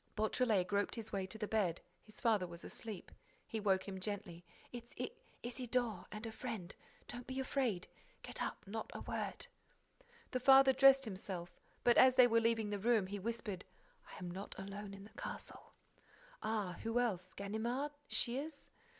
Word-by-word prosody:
Beautrelet 215 -2 +2
groped 200 +2 0
his 225 -2 -6
way 190 -1 -1
to 205 - -5
the 215 -1 -2
bed. 195 -7 +1 0.2
His 215 0 -11
father 215 -6 +3
was 170 0 -9
asleep. 215 -5 -7 0.3
He 225 - -3
woke 195 -2 +2
him 190 -1 -4
gently: 190 -3 -4 0.3
"It's 240 0 -9
I—Isidore—and 240 -4 -3
a 225 - -4
friend—don't 230 +2 -7
be 260 +1 -3
afraid—get 265 - -3
up—not 220 +3 -4
a - - -4
word." - - -3 0.9
The 255 - 0
father 270 +1 +8
dressed 270 0 +7
himself, 185 -4 -5 0.3
but, 240 -1 +6
as 255 0 +8
they 250 - +9
were 230 -1 +4
leaving 225 -2 +2
the 205 - -1
room, 220 -1 +3
he 200 +2 -4
whispered: 210 -3 -3 0.5
"I - - -9
am 180 -2 -5
not 190 +3 -6
alone 200 +1 -6
in 195 - -10
the 210 - -13
castle—" - - -6 0.7
"Ah? 205 -5 -1
Who 225 +2 +1
else? 185 -7 -1
Ganimard? 235 +8 -1 0.2
Shears?" 280 +5 0
220 Hz, 155 wpm, -37 LUFS, 195-245 Hz, 0.9 s, they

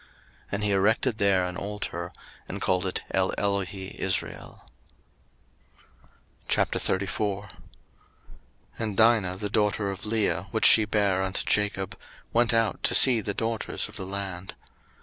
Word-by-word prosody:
01:033:020 - - -26 0.4
And 100 +1 -2
he 105 - +1
erected 110 +4 +2
there 95 -2 +3
an 90 0 -5
altar, 100 -4 -5 0.4
and - - -5
called 95 0 0
it 90 - -2
EleloheIsrael. 95 -1 -2 1.9
01:034:001 100 +1 -1 1.3
And 105 -3 -3
Dinah 110 -5 +4
the 105 +1 -3
daughter 105 -1 +1
of 95 - -8
Leah, 100 -4 0
which 110 - +1
she 110 - +7
bare 100 -3 +1
unto 95 0 -2
Jacob, 100 -2 0 0.4
went 120 0 +3
out 115 -2 +1
to - - +1
see 125 -4 +6
the 100 -1 -2
daughters 115 -1 -2
of - - -13
the 95 - -5
land. 95 -2 -5
100 Hz, 130 wpm, -26 LUFS, 95-105 Hz, 1.9 s, she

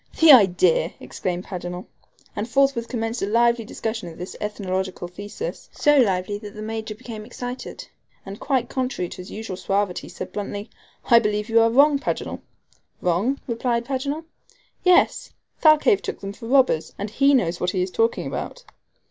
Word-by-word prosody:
"The 320 -1 +9
idea!" 180 - +5
exclaimed 180 0 -4
Paganel. 180 -1 -6 0.5
And 215 +3 -3
forthwith 270 -3 +2
commenced 230 -1 -3
a 195 - 0
lively 235 +2 +3
discussion 220 -2 -4
of 160 - -12
this 180 +1 -7
ethnological 190 -3 -3
thesis 205 - -7
so 295 0 +3
lively 200 -3 +1
that 210 -1 -10
the 215 - -6
Major 220 0 -4
became 220 -2 -8
excited, 245 +3 -7 0.4
and, 195 +1 -8
quite 265 -4 0
contrary 250 -9 -2
to - - -9
his 180 0 -9
usual 215 -4 -6
suavity, 195 -1 -1
said 185 - -8
bluntly: 205 +1 -5 0.4
"I 235 - +9
believe 210 0 -1
you 225 0 +5
are 230 - +4
wrong, 280 +4 +5
Paganel." - - -3 0.6
"Wrong?" 195 +11 0
replied 235 0 -1
Paganel. 280 +5 -3 0.6
"Yes. 360 -1 +3 0.3
Thalcave 315 +6 +5
took - - -5
them 195 0 -5
for 225 - -10
robbers, 255 - +2
and 205 +1 -5
he 275 +4 +4
knows 175 -8 +1
what 180 - 0
he 180 -1 0
is 185 - -4
talking 225 +3 +1
about." - - -5
220 Hz, 165 wpm, -23 LUFS, 190-255 Hz, 0.6 s, The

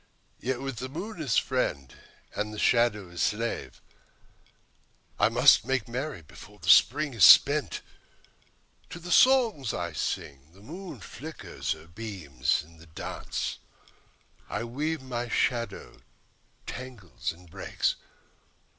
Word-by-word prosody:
Yet 130 0 -2
with 135 -3 -4
the 130 +2 -5
moon 175 +5 -6
as 135 -8 +1
friend 70 - -1 0.4
and 105 0 -3
the 105 - -8
shadow 105 -6 +2
as 90 - -5
slave 115 +2 -2 1.4
I - - +5
must - - +6
make 130 -4 -1
merry 125 - -4
before 75 - -14
the - - -5
Spring 145 +2 +5
is 115 - +1
spent. 145 -4 +7 1.1
To - - -8
the 175 +1 -8
songs 230 - +4
I 85 -2 -3
sing 70 +1 -4
the 95 - -18
moon 175 - -9
flickers 160 +3 -5
her 80 0 -14
beams; 85 - -2
In 80 +2 -18
the 85 +1 -16
dance 80 - -5 0.9
I 105 - -3
weave 145 +6 -3
my 120 -2 -4
shadow 115 -4 -2 0.6
tangles 95 - -6
and 90 +2 -16
breaks. - - -1
115 Hz, 130 wpm, -28 LUFS, 85-140 Hz, 1.4 s, spent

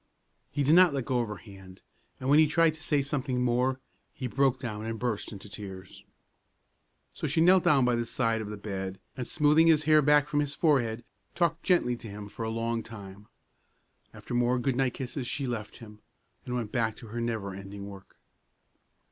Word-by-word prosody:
He 145 - -1
did 145 +3 +4
not 175 -4 +6
let 135 -3 -2
go 125 -2 0
of 120 - -1
her 105 - -5
hand; 95 -3 -14 0.4
and 130 - -5
when 145 +3 +6
he 155 - +6
tried 160 +1 +3
to 155 - -15
say 145 -3 +1
something 135 -3 -1
more, 125 +2 +1 0.4
he 130 - -5
broke 130 +1 +1
down 110 -5 -5
and 115 0 -4
burst 115 -3 -3
into 100 -1 -9
tears. 95 -2 -10 1.1
So - - -3
she - - 0
knelt 180 +2 +6
down 135 -4 +5
by 125 - +2
the 120 0 -1
side 115 -3 0
of 105 - -6
the 105 - -6
bed, 95 -2 -5 0.2
and 125 -2 -5
smoothing 155 +2 +4
his 155 -2 +5
hair 155 0 +5
back 150 0 +4
from 145 0 0
his 145 -1 -1
forehead, 120 -8 +1 0.3
talked 170 -1 +1
gently 170 -11 +2
to 115 - -9
him 100 0 -8
for 115 - -7
a 110 - -2
long 115 +1 -1
time. 100 -2 -11 0.8
After - - -9
more 120 +1 +2
good 125 +1 0
night 130 -1 0
kisses 130 0 -5
she 145 -1 -2
left 115 -4 -5
him, 105 -3 -13 0.5
and 125 - -2
went 115 -4 -3
back 115 -3 0
to 115 - -12
her 120 +2 -4
never 110 -4 -3
ending 100 +1 -8
work. 100 -1 -12
120 Hz, 205 wpm, -28 LUFS, 110-145 Hz, 1.1 s, not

